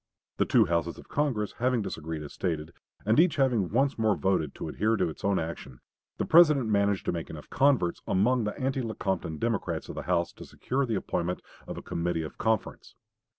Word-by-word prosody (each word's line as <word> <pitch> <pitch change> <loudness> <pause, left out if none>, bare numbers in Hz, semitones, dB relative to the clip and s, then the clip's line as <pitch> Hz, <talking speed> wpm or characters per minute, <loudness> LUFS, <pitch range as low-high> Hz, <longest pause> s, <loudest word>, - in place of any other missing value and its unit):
The - - +2
two 115 -3 +5
Houses 85 -3 -1
of - - -14
Congress 130 -8 0
having 125 -2 +1
disagreed 80 -3 -5
as 75 - -9
stated, 80 -3 -3 0.3
and 110 +5 +4
each 165 -2 +5
having 125 - +2
once 135 +3 +1
more 110 -2 +3
voted 95 -7 0
to - - -5
adhere 110 +3 +1
to 90 -3 +1
its 80 - -10
own 100 -1 +2
action, 75 -6 -5 0.4
the - - -1
President 150 -8 +6
managed 100 -1 +2
to - - +1
make 85 -2 -4
enough 75 -2 -10
converts 135 -11 +2
among 115 +5 +2
the 105 +6 -4
anti 135 0 0
Lecompton 95 -8 -2
Democrats 115 +3 -2
of - - -5
the - - -5
House 85 -1 +1
to - - -11
secure 135 +1 -2
the 115 - 0
appointment 90 -2 -2 0.3
of - - -6
a - - -7
committee 85 -1 -2
of 80 - -9
conference. 110 -1 -1
100 Hz, 200 wpm, -28 LUFS, 85-125 Hz, 0.4 s, President